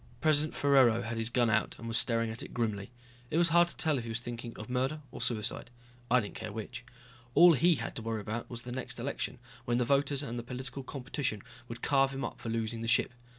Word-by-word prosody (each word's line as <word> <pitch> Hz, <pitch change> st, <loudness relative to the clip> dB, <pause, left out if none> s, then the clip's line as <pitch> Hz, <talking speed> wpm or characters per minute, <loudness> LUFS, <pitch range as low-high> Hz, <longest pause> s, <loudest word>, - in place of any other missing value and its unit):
President 155 Hz, -1 st, +2 dB
Ferraro 130 Hz, -5 st, +4 dB
had 115 Hz, 0 st, -4 dB
his 115 Hz, 0 st, -1 dB
gun 120 Hz, 0 st, +2 dB
out 110 Hz, -, +1 dB
and 115 Hz, -, -8 dB
was 115 Hz, -, -2 dB
staring 115 Hz, -1 st, +3 dB
at 110 Hz, -, -6 dB
it -, -, -8 dB
grimly. 110 Hz, -4 st, -1 dB, 0.4 s
It 155 Hz, -, 0 dB
was 170 Hz, 0 st, +4 dB
hard 175 Hz, +1 st, +5 dB
to -, -, -9 dB
tell 155 Hz, -3 st, +2 dB
if -, -, -5 dB
he 115 Hz, -, -6 dB
was 115 Hz, +1 st, 0 dB
thinking 120 Hz, -1 st, -7 dB
of 110 Hz, -, -7 dB
murder 130 Hz, +5 st, -1 dB
or -, -, -8 dB
suicide. 115 Hz, 0 st, -1 dB, 0.4 s
I 125 Hz, -, +5 dB
didn't 105 Hz, -4 st, -5 dB
care 110 Hz, -, -5 dB
which. 110 Hz, +2 st, -6 dB, 0.5 s
All 175 Hz, 0 st, +9 dB
he 165 Hz, +4 st, +4 dB
had 115 Hz, -4 st, -5 dB
to -, -, -3 dB
worry 110 Hz, -1 st, -2 dB
about 110 Hz, +3 st, -4 dB
was 120 Hz, -1 st, -6 dB
the 125 Hz, -, -7 dB
next 125 Hz, -1 st, -4 dB
election, 135 Hz, +1 st, -3 dB, 0.3 s
when 120 Hz, 0 st, +1 dB
the 125 Hz, -, +2 dB
voters 140 Hz, +2 st, +2 dB
and 120 Hz, -3 st, -4 dB
the -, -, -3 dB
political 125 Hz, +3 st, -6 dB
competition 130 Hz, -4 st, -3 dB, 0.2 s
would 115 Hz, 0 st, -8 dB
carve 135 Hz, -1 st, +3 dB
him 135 Hz, -, -2 dB
up -, -, -6 dB
for 115 Hz, -, -4 dB
losing 115 Hz, 0 st, -2 dB
the 115 Hz, -, -3 dB
ship. 120 Hz, -, +3 dB
120 Hz, 240 wpm, -31 LUFS, 115-135 Hz, 0.5 s, All